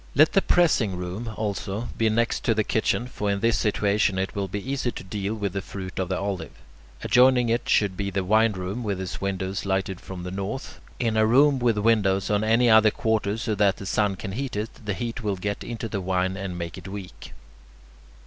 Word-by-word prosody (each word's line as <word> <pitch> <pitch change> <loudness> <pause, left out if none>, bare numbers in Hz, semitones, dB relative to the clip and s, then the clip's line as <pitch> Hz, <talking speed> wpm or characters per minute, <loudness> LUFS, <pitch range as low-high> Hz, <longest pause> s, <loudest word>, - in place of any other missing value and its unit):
Let 155 +3 +5
the 195 - +5
pressing 140 - +3
room, 90 +6 -5
also, 105 +1 -3
be 115 -1 +2
next 115 +2 0
to 115 - +3
the 110 - +2
kitchen; 110 +3 0
for 105 -5 -3
in 100 0 0
this 115 0 +3
situation 100 -2 +1
it 95 0 -2
will 100 -1 -1
be 100 +5 -5
easy 130 -3 -1
to - - -8
deal 100 +2 -3
with 100 -4 -3
the 100 - -2
fruit 95 -2 -7
of 95 -2 -1
the 95 - 0
olive. 100 -1 -3 0.5
Adjoining 125 -1 +4
it 115 +1 0
should 100 -3 +3
be 100 +2 -2
the 95 0 -1
wine 110 +3 +3
room 95 +5 -4
with 100 -3 -2
its 95 0 -5
windows 95 0 -2
lighted 95 -1 -1
from 90 -2 -8
the 90 - -5
north. 100 +7 -5 0.2
In 115 -3 0
a 110 0 +4
room 135 +4 +5
with 120 -3 +2
windows 105 -3 +2
on 105 0 +2
any 115 +3 +3
other 110 -1 +7
quarter 110 -1 0
so 115 -1 -2
that 100 -2 +2
the 100 - -8
sun 100 0 +1
can 95 +1 -6
heat 130 +4 -4
it, 105 +2 -3
the 105 -2 -2
heat 120 +4 -4
will 105 -3 -1
get 100 +2 -4
into 115 -1 -5
the 100 -3 -3
wine 95 0 0
and 95 -2 -5
make 85 -1 -5
it - - -11
weak. 95 -1 -9
105 Hz, 220 wpm, -25 LUFS, 95-115 Hz, 0.5 s, other